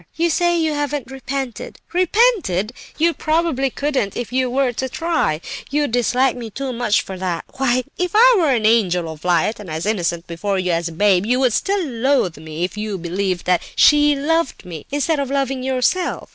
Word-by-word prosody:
You 335 +1 +1
say 345 +1 +2
you 320 -2 0
haven't 290 -3 -3
'repented.' 270 -2 -5 0.2
Repented! 360 - +2 0.2
You 335 +2 +3
probably 310 -5 0
couldn't, 270 -7 -2
if 245 0 -5
you 255 -1 +1
were 255 0 +1
to 260 +3 -3
try; 325 - -1 0.3
you 295 +1 +1
dislike 245 +2 +1
me 235 -2 -7
too 265 +4 -4
much 235 -3 +1
for 190 -1 -8
that. 180 -3 -3
Why, 255 -1 +1 0.2
if 360 -1 -1
I - - +7
were 325 -4 +2
an 235 -5 +1
angel 185 -7 +2
of 155 -1 -12
light, 180 +5 +1
and 205 -4 -9
as 160 +3 -4
innocent 175 -5 -1
before 190 +4 -2
you 185 -1 0
as 170 0 0
a - - -6
babe, 195 +2 +2
you 250 +2 +2
would 255 -4 +3
still 395 - 0
loathe 245 - 0
me 160 +1 -6
if 180 +3 -3
you 210 -2 -3
believed 180 +1 -2
that 180 -1 +2
she 295 -1 +5
loved 325 +2 -1
me, 165 -4 -9
instead 290 +2 0
of 275 -2 -2
loving 270 -1 -1
yourself. 265 +8 -1
250 Hz, 195 wpm, -20 LUFS, 190-290 Hz, 0.3 s, I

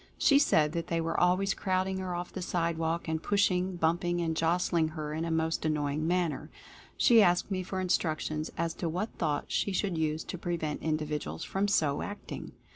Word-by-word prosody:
She 280 -1 +5
said 150 - +3
that 170 +1 -3
they 170 - 0
were 165 0 -1
always 185 +2 +3
crowding 190 0 -1
her 185 -1 -3
off 175 +1 -5
the 190 - -4
sidewalk 170 -1 -1
and 160 0 -1
push 205 +1 +2
ing, 180 +1 -1
bumping 175 +1 +1
and 165 -2 -1
jostling 165 0 +2
her 155 -1 -5
in 160 +2 -2
a - - -2
most 160 0 0
annoying 150 0 0
manner. 165 -4 0 0.5
She 235 -3 +6
asked 175 +1 +3
me 185 -1 0
for 185 +1 -4
instructions 155 -4 -1
as 165 0 -1
to 170 - -3
what 185 +7 -3
thought 150 -3 -1
she 200 - 0
should 185 -3 -1
use 155 0 0
to 180 - -6
prevent 165 -4 -2
individuals 150 - -2
from 195 +1 -1
so 155 -8 +1
acting. 205 0 -7
170 Hz, 195 wpm, -30 LUFS, 155-185 Hz, 0.5 s, She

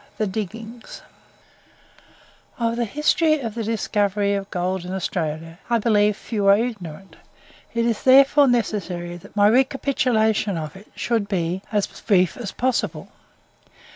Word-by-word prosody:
THE 215 - 0
DIGGINGS 220 +4 -6 1.5
Of 230 -1 0
the 240 0 0
history 310 - +2
of 230 -5 -4
the 230 0 -3
discovery 205 -2 0
of 195 0 -3
gold 180 0 -2
in 180 +1 -6
Australia 165 -2 -3
I 235 - +3
believe 210 -2 +2
few 205 -4 -2
are 200 0 +7
ignorant; 195 -6 -5 0.6
it 230 0 +1
is 230 -2 0
therefore 275 +2 +6
necessary 185 -8 -1
that 175 - -16
my 205 0 +5
recapitulation 230 -5 +2
of 155 0 -6
it 200 +3 -15
should 225 -4 -1
be 180 -1 -1
as 205 -2 +1
brief 185 -5 +1
as 225 -6 -6
possible. 255 -1 -2
210 Hz, 140 wpm, -22 LUFS, 190-235 Hz, 1.5 s, are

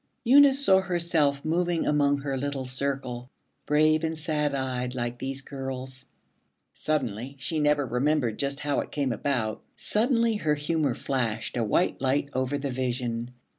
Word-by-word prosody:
Eunice 275 +2 +6
saw 190 0 +6
herself 170 -6 0
moving 170 +1 +1
among 145 -1 +3
her 135 -1 -2
little 135 0 -3
circle, 130 -1 -3 0.4
brave 155 +1 +3
and 160 0 -1
sad 150 -2 -1
eyed 125 -1 -2
like 120 -1 -3
these 135 +1 -3
girls. 130 -1 -6 0.7
Suddenly 130 -3 -2
she 160 +3 -2
never 150 -1 +2
remembered 125 -1 0
just 140 0 -1
how 145 -1 0
it - - -4
came 140 -3 -1
about 115 -2 -1 0.2
suddenly 230 0 +1
her 150 -6 +1
humor 150 -3 0
flashed 115 -5 -2
a 120 - +1
white 115 - +1
light 140 +1 +1
over 130 +2 0
the 140 -1 -3
vision. 120 -2 -2
140 Hz, 150 wpm, -27 LUFS, 130-155 Hz, 0.7 s, Eunice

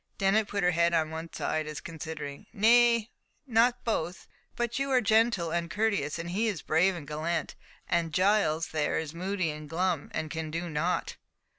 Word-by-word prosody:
Dennet 200 +2 +2
put 200 -2 -2
her 180 - +4
head 170 0 +2
on 160 -1 +1
one 160 +1 -6
side, 155 -1 -2
as 155 -1 -5
considering. 160 0 -7
"Nay, 235 +1 +4 0.3
not 245 0 +3
both; 180 -6 -2 0.3
but 240 +1 -1
you 275 0 -1
are 260 -1 +4
gentle 220 -6 +2
and 170 0 -1
courteous, 200 -7 0
and 170 +1 -5
he 215 +5 +1
is 200 -7 -3
brave 180 +4 +3
and 150 -5 -8
gallant—and 165 +2 -3
Giles 185 -3 +2
there 155 -2 0
is 160 -1 -3
moody 185 -1 -1
and 150 0 -9
glum, 170 -2 -1
and 155 - -3
can 160 -1 -4
do 165 +2 -4
nought." 165 +4 -1
170 Hz, 175 wpm, -29 LUFS, 160-215 Hz, 0.3 s, her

